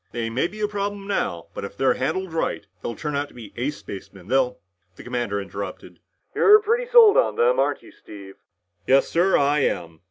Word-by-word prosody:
They 115 -1 -3
may 130 +8 0
be 210 +4 -12
a 210 - +1
problem 205 -1 -4
now, 90 - -2
but - - -6
if 100 0 -8
they're 135 - +3
handled 180 +6 -3
right, 160 -9 -2 0.2
they'll 115 - -4
turn 150 -2 -4
out 145 +1 -1
to - - -20
be 115 -4 -11
ace 140 +5 -3
spacemen, 95 -1 -10
they'll 130 -1 +1 0.2
" 90 +1 -45
The - - -12
commander 120 -5 -2
interrupted. 100 0 -7 0.3
"You're 420 +1 +7
pretty 465 +3 -1
sold 460 -3 +8
on - - +2
them, 485 +2 +2
aren't - - 0
you, 330 - -15
Steve?" 100 - -12 0.5
"Yes, 135 +1 +4
sir, 180 +3 +2
I 145 +1 +2
am." 85 -10 -2
135 Hz, 210 wpm, -23 LUFS, -, 0.5 s, sold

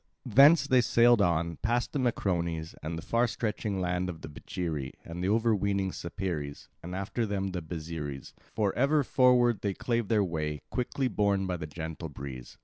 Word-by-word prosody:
Thence 140 +6 +7
they 130 -3 +4
sailed 120 -2 +5
on, 85 -3 +1
past 120 +2 -1
the 145 - 0
Macrones 85 -9 -1
and 80 +2 -4
the 80 - -6
far 120 +1 +2
stretching 110 -4 -2
land 90 0 -1
of 85 -3 -7
the - - -7
Becheiri 75 -2 -4
and 85 +2 -6
the 95 - +1
overweening 100 -3 +1
Sapeires, 85 -6 -5
and 90 +2 -6
after 100 +5 -2
them 95 -1 -1
the 90 -1 -3
Byzeres; 80 -4 -6 0.2
for 105 -3 +1
ever 140 +3 +3
forward 125 -3 +4
they 100 -2 -1
clave 120 -3 -1
their 105 -1 +3
way, 75 -4 -2
quickly 130 +1 -1
borne 100 -3 +1
by 90 -1 -2
the 75 - -6
gentle 80 +1 -6
breeze. 65 -3 -8
95 Hz, 175 wpm, -29 LUFS, 80-115 Hz, 0.2 s, Thence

